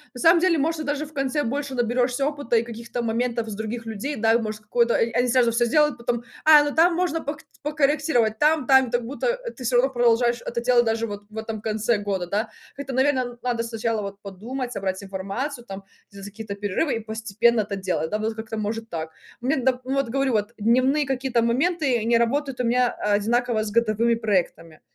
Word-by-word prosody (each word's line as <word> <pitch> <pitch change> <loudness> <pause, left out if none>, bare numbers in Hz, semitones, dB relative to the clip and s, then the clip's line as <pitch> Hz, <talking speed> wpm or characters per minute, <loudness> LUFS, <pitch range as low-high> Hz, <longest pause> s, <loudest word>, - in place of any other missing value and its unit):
На 245 - -7
самом 330 +3 +5
деле 360 -3 +3
можно 315 +2 -1
даже 290 +1 -2
в 310 - -15
конце, 275 +1 -1
больше 275 +3 -3
наберешься 245 +2 0
опыта, 285 -5 0
и 225 - +2
каких-то 235 +1 -6
моментов 235 0 -1
с 205 - -5
других 220 +2 -5
людей. 225 +7 -4
Да, 225 0 +3
и - - +5
может 215 -2 -4
какой-то, 235 +3 +1
э, 230 - +2
о - - +1
они 250 - +2
сразу 240 -1 +3
всё 230 +1 +2
сделают, 300 +2 +2
потом, 235 0 -2 0.2
а, 305 -1 +8
ну 290 - -3
там 335 +2 +4
можно 340 -2 0
подк 290 +2 -5 0.2
покорректировать, 285 -6 +1
там 305 -3 +2
там 265 -3 +5
так, 240 -1 0
будто 485 - -1 0.2
ты 260 - -9
всё 245 0 +2
равно 260 +3 +4
продолжаешь 240 -1 +2
это 235 - -2
делать 245 0 +4
даже 225 +1 0
вот 205 0 -7
в 220 - -12
этом 220 -1 -5
конце 220 +1 0
года, 195 -3 -3
да. 205 +5 -1 0.3
Это, 275 -1 -6
наверное, 255 -2 +1
надо 240 -2 -1
сначала 230 -1 -2
вот 200 0 -7
подумать, 240 +6 -6
собрать 190 -1 -3
информацию, 200 +8 -5
там, 195 -3 -8 0.3
сделать 200 0 -10
какие-то 205 0 -7
перерывы, 205 - -1
и - - -2
постепенно 220 +1 +1
это 200 -1 -4
делать, 180 -4 -2
да. 210 - -1
Надо 220 +1 -2
как-то 220 0 -6
может 225 +2 -3
так. 160 -3 -5 0.3
Мне, 260 +6 0
да, 255 0 +1
вот 270 -2 -1
говорю 270 0 0
вот, 210 +2 -1
дневные 255 +7 +2
какие-то 260 -2 0
моменты, 270 +3 +1
они 230 +2 +2
работают 265 +3 0
у 250 - 0
меня 245 +1 +3
одинаково 220 +3 0
с 210 - -5
годовыми 235 +1 +2
проектами. 180 -7 -2
235 Hz, 210 wpm, -24 LUFS, 220-270 Hz, 0.3 s, а